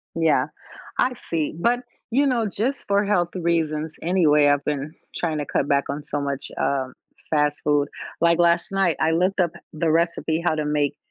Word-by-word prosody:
Yeah, 155 -5 +3 0.5
I 250 0 +3 0.2
see, 160 -3 -1
but, 245 +5 +2 0.3
you 275 +4 +3
know, 240 -5 +1
just 235 +8 -2
for 200 +1 +3
health 175 -3 +1
reasons, 160 -3 -1
anyway, 160 -4 +4
I've 145 0 +2
been 150 +1 -2 0.2
trying 160 -3 -1
to 145 - -2
cut 140 - -1
back 140 0 +2
on 145 +1 -3
so 145 0 -3
much, 140 0 -3
uh, 135 -2 0 0.4
fast 150 -1 +1
food, 145 -1 +2 0.3
like 170 0 +4
last 170 +2 +3
night, 195 -4 +2
I 160 +1 +2
looked 185 +4 +1
up 170 -3 +2 0.2
the 155 0 0
recipe 165 0 +1
how 160 - +2
to 155 -1 -2
make 150 -1 0
160 Hz, 185 wpm, -23 LUFS, 150-175 Hz, 0.5 s, anyway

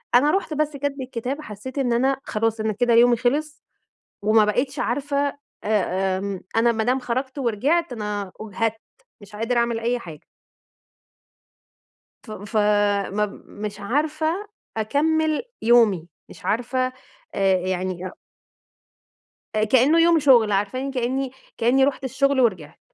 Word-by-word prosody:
أنا 290 +5 +5
رُحت 385 -5 -1
بس 300 -1 -1
كَتب 280 -1 -3
الكتاب 255 +3 -4
حسّيت 255 +1 -9
إن 250 -4 +1
أنا 265 +3 +2
خلاص 225 0 -1
أنا 215 -1 0
كده 240 +2 +2
يومي 240 0 +6
خلص، 290 +5 -1 0.6
وما 215 0 +5
بقتش 260 +6 -1
عارفة 280 +3 -1 0.5
آآ 190 -3 0
آمم 195 -1 -4
أنا 235 +1 +4
ما 220 -1 -1
دام 255 +3 +1
خرجت 260 +3 -3
ورجعت 270 +6 0
أنا 205 -3 -4
أُجهدت، 220 +1 -2 0.4
مش 205 +1 -13
قادرة 235 +3 0
أعمل 235 -1 0
أي 240 +1 0
حاجة. 160 -8 -11 2.0
فم 215 -2 -8
ف 215 +2 -6 0.6
مب 210 0 -2
مش 210 0 -7
عارفة 310 - -1 0.3
أكمّل 310 - +1 0.2
يومي، 220 -8 +4 0.2
مش - - -14
عارفة 245 +3 -1
آآ - - -12 0.4
أ 190 -1 +3
يعني 185 0 -2
أأ - - -6 1.4
آآ 215 - +3
كأنُّه 260 +8 +4
يوم 335 0 +5
شُغل 245 -7 +5
عارفاني 210 +8 -1
كأنّي، 260 +1 -1 0.3
كأنّي 260 +3 +4
رُحت 275 -1 -1
الشغل 275 +1 +1
ورجعت. 185 -11 0
240 Hz, 140 wpm, -23 LUFS, 210-275 Hz, 2.0 s, يومي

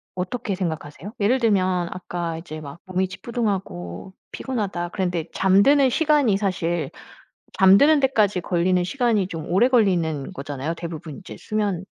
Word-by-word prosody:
어떻게 200 +4 -3
생각하세요? 165 +1 -5
예를 225 +6 +2
들면 185 -6 +1
아까 175 -2 -4
이제 155 -2 -8
막 145 +3 -9
"몸이 185 0 -1
찌뿌둥하고 190 - -4 0.2
피곤하다." 200 -9 -3
그랬는데 180 -4 -2
잠드는 255 +9 +4
시간이 290 -7 +3
사실 175 -4 -1 0.7
잠드는 210 +11 +6
데까지 215 -8 +2
걸리는 180 +1 +1
시간이 230 -2 +1
좀 165 -4 -6
오래 200 +8 +4
걸리는 175 - +1
거잖아요. 145 +3 -4
대부분 165 -3 -7
이제 190 - -10
수면 205 -4 -2
185 Hz, 345 characters per minute, -23 LUFS, 170-215 Hz, 0.7 s, 잠드는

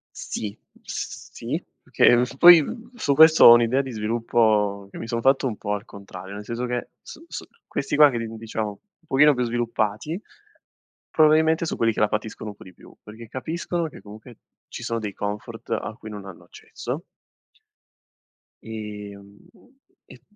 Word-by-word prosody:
Sì, 105 -2 -5 0.3
sì, - - -6 0.2
perché 120 0 +4 0.2
poi 170 +2 +9 0.3
su 145 -11 0
questo 160 +2 +8
ho 120 - +11
un'idea 120 +3 +3
di 135 -1 -4
sviluppo 105 -2 0
che - - -10
mi 115 - -7
son 115 0 -2
fatto 135 +1 +3
un 110 -4 -2
po' 105 - -4
al 105 +2 -4
contrario, 100 -1 -10
nel 105 +1 -8
senso 120 +3 -4
che 120 -1 -4
su 325 - -12
su - - -7 0.2
questi 140 +1 -2
qua 150 -1 +8
che, 120 - -3
diciamo, 110 -1 -4
un 165 - -15
pochino 150 +2 +5
più 125 - -1
sviluppati, 120 - -2 0.9
probabilmente 160 +1 +4
sono 165 - -4
quelli 115 -1 +2
che - - -4
la 105 - +4
patiscono 105 0 -4
un 105 - -12
po' - - -14
di 90 -1 -14
più, - - -17
perché 110 +2 -11
capiscono 165 +6 -3
che - - -14
comunque 110 +3 -13 0.3
ci - - -8
sono 115 - -2
dei 105 -3 -5
comfort 105 0 -6
a - - -2
cui 110 - -10
non 105 -2 -8
hanno 95 -3 -12
accesso 135 +8 -7 1.6
ehm, 105 -2 -9 0.7
e 125 -2 -16
115 Hz, 165 wpm, -24 LUFS, 105-135 Hz, 1.6 s, ho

